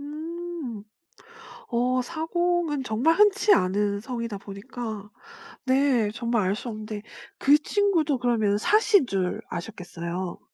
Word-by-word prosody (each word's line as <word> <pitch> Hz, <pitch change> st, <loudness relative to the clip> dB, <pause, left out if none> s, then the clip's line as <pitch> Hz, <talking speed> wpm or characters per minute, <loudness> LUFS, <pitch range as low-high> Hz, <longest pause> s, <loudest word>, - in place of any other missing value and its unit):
음. 310 Hz, -5 st, -6 dB, 0.9 s
어 250 Hz, +2 st, +1 dB
사공은 330 Hz, 0 st, -1 dB
정말 255 Hz, +8 st, +2 dB
흔치 410 Hz, +1 st, +5 dB
않은 200 Hz, +2 st, +1 dB
성이다 235 Hz, -4 st, -4 dB
보니까 210 Hz, +1 st, -7 dB, 0.6 s
네 260 Hz, -5 st, +3 dB
정말 235 Hz, -1 st, 0 dB
알 200 Hz, -, +1 dB
수 240 Hz, -, -6 dB
없는데 215 Hz, -1 st, -6 dB, 0.4 s
그 285 Hz, +2 st, +5 dB
친구도 320 Hz, -5 st, +1 dB
그러면 220 Hz, -4 st, +2 dB
사씨인 410 Hz, -, +4 dB
줄 185 Hz, -3 st, -1 dB
아셨겠어요. 175 Hz, -2 st, -5 dB
245 Hz, 235 characters per minute, -26 LUFS, 210-315 Hz, 0.9 s, 흔치